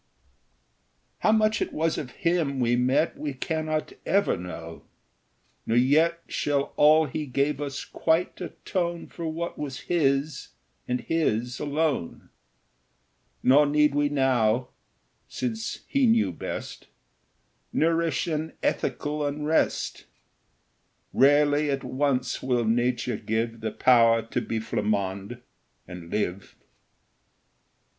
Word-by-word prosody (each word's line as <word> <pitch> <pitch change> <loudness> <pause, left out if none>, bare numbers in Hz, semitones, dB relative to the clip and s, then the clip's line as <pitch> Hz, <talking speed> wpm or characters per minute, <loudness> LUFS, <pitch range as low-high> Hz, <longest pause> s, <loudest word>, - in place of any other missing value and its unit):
How 215 - +3
much 215 0 +2
it - - -1
was 160 +1 0
of 135 - -6
him 160 -2 0
we 120 -1 +2
met 130 +6 +1
We 145 -3 -4
cannot 155 +2 -2
ever 200 +1 +2
know; 85 -2 -8 0.9
nor 115 - +2
yet 160 +7 +3
Shall 140 -1 -1
all 155 +2 +6
he 150 +2 -4
gave 140 +2 0
us 140 -2 -4
quite 165 +3 0
atone 175 -1 -3
For 170 -2 -6
what 165 +2 -4
was 135 -3 -5
his, 145 -3 0 0.4
and 125 0 -1
his 125 -7 -1
alone; 150 - -2 1.1
Nor 145 +3 +6
need 150 0 +3
we 145 0 +2
now, 125 -4 +2 0.6
since 110 -3 -4
he 275 -2 +2
knew 225 - +3
best, 85 - -7 0.8
Nourish 165 -1 +1
an 160 -1 -3
ethical 150 +3 -1
unrest: 150 +2 0 1.1
Rarely 145 +2 +4
at 135 -1 -1
once 130 -1 -1
will 125 -2 0
nature 120 0 0
give 115 +2 -2
The 110 - -1
power 115 0 +4
to 115 - -3
be 115 - -3
Flammonde 100 +1 -2 0.5
and 90 -2 -9
live. 100 -1 -3
140 Hz, 115 wpm, -26 LUFS, 120-155 Hz, 1.1 s, all